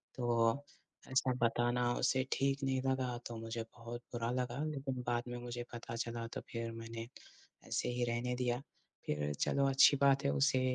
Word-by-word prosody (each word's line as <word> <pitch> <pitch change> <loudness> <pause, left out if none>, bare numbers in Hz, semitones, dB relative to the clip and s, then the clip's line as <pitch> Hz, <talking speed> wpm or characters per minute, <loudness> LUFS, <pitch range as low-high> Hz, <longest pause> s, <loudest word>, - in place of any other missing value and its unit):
तो 120 +1 +2 0.5
ऐसा 130 0 +3
बताना 120 +1 +2
उसे 130 -1 +3
ठीक 135 0 +1
नहीं 130 -1 +1
लगा, 130 -2 0
तो 120 - -6
मुझे 115 +1 -4 0.2
बहुत 120 +1 -6
बुरा 115 -1 -1
लगा 125 +2 -1
लेकिन 135 -4 -3
बाद 120 0 +1
में 120 0 -4
मुझे 120 0 -4
पता 115 0 -5
चला 115 0 -3
तो - - -3
फिर 115 -1 -3
मैंने 115 0 -6 0.6
ऐसे - - 0
ही 120 0 0
रहने 120 +1 0
दिया। 125 0 0 0.5
फिर 75 0 0
चलो 140 0 +3
अच्छी 135 +2 +7
बात 140 0 +5
है, 140 - +4
उसे 135 -2 +3
120 Hz, 175 wpm, -35 LUFS, 115-130 Hz, 0.6 s, अच्छी